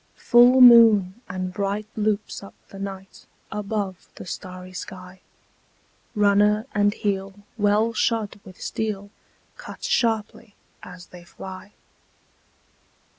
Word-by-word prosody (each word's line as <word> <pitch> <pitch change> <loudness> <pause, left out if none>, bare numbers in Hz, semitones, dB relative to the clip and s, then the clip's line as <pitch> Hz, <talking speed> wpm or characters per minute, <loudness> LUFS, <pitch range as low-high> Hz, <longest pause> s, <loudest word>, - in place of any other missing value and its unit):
Full 245 +2 +5
moon 225 -4 +7
and 185 0 -4
bright 200 +1 -2
loops 215 -1 -2
up 195 - -13
the 195 - -11
night 195 -1 -9 0.2
Above 205 -3 -4
the - - -10
starry 185 0 -8
sky. 185 0 -9 0.9
Runner 210 +1 +3
and 205 0 +2
heel, 200 -1 -4
well 210 +1 +1
shod 220 -2 -1
with 185 -1 -14
steel, 205 -2 -4 0.5
Cut - - -11
sharply 225 -2 -1 0.3
as 180 -1 -11
they 180 -1 -14
fly. 190 +3 -11
205 Hz, 110 wpm, -23 LUFS, 190-215 Hz, 0.9 s, moon